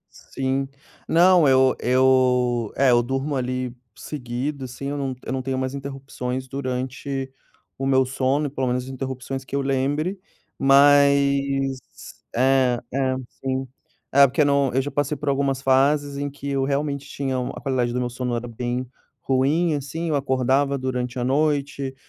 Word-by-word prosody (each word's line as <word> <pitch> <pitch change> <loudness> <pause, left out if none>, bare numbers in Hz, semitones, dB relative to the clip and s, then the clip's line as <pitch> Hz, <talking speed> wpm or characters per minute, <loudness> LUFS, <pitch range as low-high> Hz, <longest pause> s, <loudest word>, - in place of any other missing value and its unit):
Sim. 135 0 -3 0.4
Não, 175 -1 +5
eu 130 0 +4
eu 125 -2 +2
é, 135 -1 +4
eu 120 0 +5
durmo, 135 +4 -2
ali, 125 -1 -2 0.2
seguido, 130 +3 -4
assim, 130 +2 -7
eu 145 - -3
não 135 -2 -3
eu - - -3
não 130 - -2
tenho 130 0 -2
mais 130 0 -2
interrupções 135 -2 -5
durante 130 +1 -4 0.5
o 135 - -1
meu 130 -1 +4
sono 135 +3 0
e 145 - -2
pelo 130 -2 -2
menos 125 +1 -1
interrupções 130 0 -5
que 130 - -6
eu 140 - +1
lembre. 140 +7 -1 0.4
Mas 140 -1 +4 0.6
é, 130 -1 +3
é, 130 -1 +1 0.3
sim. 130 0 -2 0.4
É 140 +1 +7
porque 140 +3 +2
no 140 -2 +2
eu 135 - +3
já 145 - -5
passei 145 +1 -1
por 145 +1 -2
algumas 135 -1 0
fases 140 +2 +2
em 145 0 -2
que 140 0 -9
eu 135 -1 0
realmente 140 0 -2
tinha 135 -2 -2
u 125 0 -3
a - - -7
qualidade 125 -3 0
do 125 - -1
meu 125 -1 -1
sono 125 -1 -3
era 120 +1 -4
bem 120 +2 -3 0.3
ruim, 145 +6 +1
assim. 150 +4 -3
Eu 155 - +1
acordava 135 +1 +1
durante 125 -1 -3
a 125 - -1
noite, 140 0 0
135 Hz, 165 wpm, -23 LUFS, 130-140 Hz, 0.6 s, É